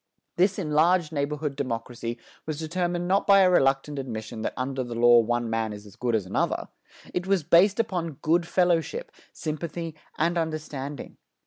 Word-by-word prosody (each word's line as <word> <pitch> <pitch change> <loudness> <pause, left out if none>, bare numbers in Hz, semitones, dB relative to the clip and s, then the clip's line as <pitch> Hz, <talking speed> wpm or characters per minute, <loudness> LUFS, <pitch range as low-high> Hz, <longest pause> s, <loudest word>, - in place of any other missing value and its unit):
This 190 +2 +2
enlarged 165 0 +2
neighborhood 145 -1 -2
democracy 120 -2 -4 0.3
was 155 -2 -3
determined 175 +2 -2
not 195 +2 +2
by 200 -1 +7
a 185 -1 +5
reluctant 135 -2 +2
admission 110 -3 -5
that - - -3
under 130 +1 -2
the 120 -1 -6
law 120 0 +7
one 120 +1 0
man 115 -1 -1
is 105 0 -10
as 100 -1 -14
good 120 -1 0
as 105 -4 0
another; 95 - -1 0.4
it 180 +1 -2
was 195 -4 +2
based 180 +6 +5
upon 175 -7 -1
"good 170 +2 +2
fellowship," 180 - +1 0.2
sympathy 165 +1 -4 0.2
and 170 +2 +1
understanding. 150 -4 -5
150 Hz, 160 wpm, -26 LUFS, 120-175 Hz, 0.4 s, by